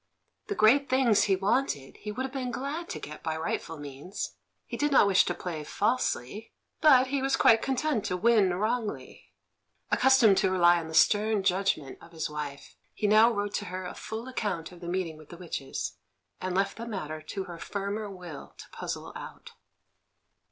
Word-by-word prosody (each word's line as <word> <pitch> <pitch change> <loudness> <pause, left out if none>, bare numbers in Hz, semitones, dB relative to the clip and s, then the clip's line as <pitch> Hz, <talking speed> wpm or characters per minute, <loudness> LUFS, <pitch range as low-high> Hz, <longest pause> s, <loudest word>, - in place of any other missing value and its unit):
The 410 - -2
great 275 - +4
things 255 -5 +4
he 195 - +3
wanted 190 - -1
he 210 - -6
would 250 +5 -3
have 265 - -7
been 260 -2 -3
glad 280 +8 -4
to - - -4
get 150 +1 -9
by 160 -1 -2
rightful 160 0 -3
means; 145 +6 -6 0.3
he - - -6
did 295 0 0
not 270 - +6
wish 195 -2 +4
to - - -2
play 165 -4 -5
falsely, 210 - -1 0.3
but 265 -5 +7
he 275 0 0
was 270 0 +2
quite 225 -1 +5
content 270 -3 0
to 180 - -1
win 210 -2 +4
wrongly. 215 +2 -3 0.6
Accustomed 250 -6 +5
to 190 - +3
rely 175 -2 +5
on 165 - -6
the 160 - -6
stern 210 +3 +4
judgment 185 -7 0
of 170 - -15
his 160 -2 -3
wife, 145 -2 -6 0.2
he - - -2
now 215 +3 +6
wrote 205 -2 -2
to 205 - -2
her 185 0 -5
a 180 - -5
full 220 +3 -6
account 200 -10 -3
of 175 - -13
the 170 - -8
meeting 175 -3 -2
with 155 -1 -15
the 170 - -10
witches, 165 -6 -5 0.4
and 185 -1 -2
left 195 +1 0
the 230 +1 -6
matter 155 -8 -5
to 190 +5 -5
her 175 -3 -9
firmer 200 +3 -4
will 180 -6 -10
to - - -10
puzzle - - -6
out. - - -9
200 Hz, 190 wpm, -28 LUFS, 170-235 Hz, 0.6 s, but